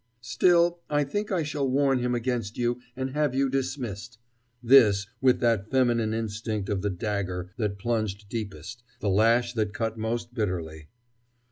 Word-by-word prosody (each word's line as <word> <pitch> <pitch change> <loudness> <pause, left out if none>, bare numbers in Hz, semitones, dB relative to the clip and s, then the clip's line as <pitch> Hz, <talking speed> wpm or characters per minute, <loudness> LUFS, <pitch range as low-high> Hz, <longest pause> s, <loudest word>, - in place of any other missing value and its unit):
"Still, 175 +6 +3
I 145 0 +2
think 205 +10 -3
I 180 -4 +1
shall 145 -2 -2
warn 135 0 +2
him 125 0 0
against 120 -3 -2
you, 120 0 -1
and 130 0 -3
have 145 -2 0
you 135 -1 +1
dismissed," 125 -4 -3 0.5
this 115 -6 +6 0.2
with 130 -2 +4
that 115 -4 +1
feminine 120 -4 +2
instinct 110 -2 -3
of 100 -3 -1
the 105 - 0
dagger 90 -2 -3
that 105 -3 -2
plunged 110 -2 -2
deepest, 110 +1 -6 0.2
the 105 - -1
lash 115 +4 +3
that 110 -2 -2
cut 115 -1 -2
most 115 +2 -3
bitterly. 85 -8 -3
115 Hz, 155 wpm, -27 LUFS, 105-130 Hz, 0.5 s, this